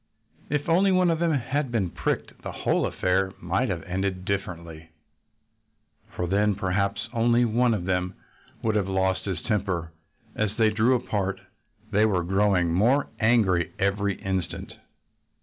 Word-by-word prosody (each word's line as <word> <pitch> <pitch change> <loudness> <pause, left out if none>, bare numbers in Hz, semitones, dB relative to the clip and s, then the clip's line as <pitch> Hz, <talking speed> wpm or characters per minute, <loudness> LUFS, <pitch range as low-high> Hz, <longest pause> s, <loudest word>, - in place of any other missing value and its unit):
If 145 +1 -1
only 185 +4 +4
one 185 -2 +4
of 165 - 0
them 170 -1 +2
had 140 0 -1
been 100 -7 0
pricked - - -3
the - - -5
whole - - 0
affair 95 +1 0
might 95 +9 0
have 85 -4 -3
ended 95 0 -3
differently. 85 -5 -4 1.3
For 90 - -1
then 100 +3 +2
perhaps 100 +3 -1
only 120 +1 +3
one 120 +1 +2
of 90 -4 -4
them 90 0 -1 0.5
would 110 - +1
have 105 -3 +1
lost 95 0 0
his 95 -5 -3
temper. 95 -7 -1 0.4
As 105 -1 -1
they 110 -2 +4
drew 115 +4 +3
apart 100 -5 -2 0.5
they 105 +1 +4
were 90 -5 +1
growing 95 -2 +2
more 120 +10 +3
angry 105 -7 +2
every 100 +1 0
instant. 95 -3 -3
100 Hz, 150 wpm, -26 LUFS, 95-115 Hz, 1.3 s, only